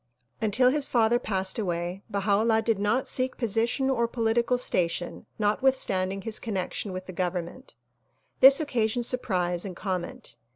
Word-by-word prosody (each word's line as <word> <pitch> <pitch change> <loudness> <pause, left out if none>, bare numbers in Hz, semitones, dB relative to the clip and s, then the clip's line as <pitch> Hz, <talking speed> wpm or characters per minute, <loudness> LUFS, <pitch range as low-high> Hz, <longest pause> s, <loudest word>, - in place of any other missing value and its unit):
Until 230 +4 +3
his 295 0 +2
father 235 0 +3
passed 190 -3 -1
away 175 -1 -3
Baha 200 +1 -1
'Ullah 225 0 +2
did 225 -3 +1
not 210 +6 0
seek 255 0 -1
posi 225 -1 +1
tion 265 +2 -1
or 235 -3 +1
political 235 +1 0
station 175 -7 -2
notwithstanding 205 -4 0
his 220 0 -2
connection 200 -1 -4
with 185 0 -6
the 185 - -8
government. 175 -5 -4 0.6
This 270 +1 +8
occasioned 240 -5 -1
surprise 180 -8 -1
and 190 -3 -6
comment. 185 -2 -5
215 Hz, 150 wpm, -26 LUFS, 185-240 Hz, 0.6 s, This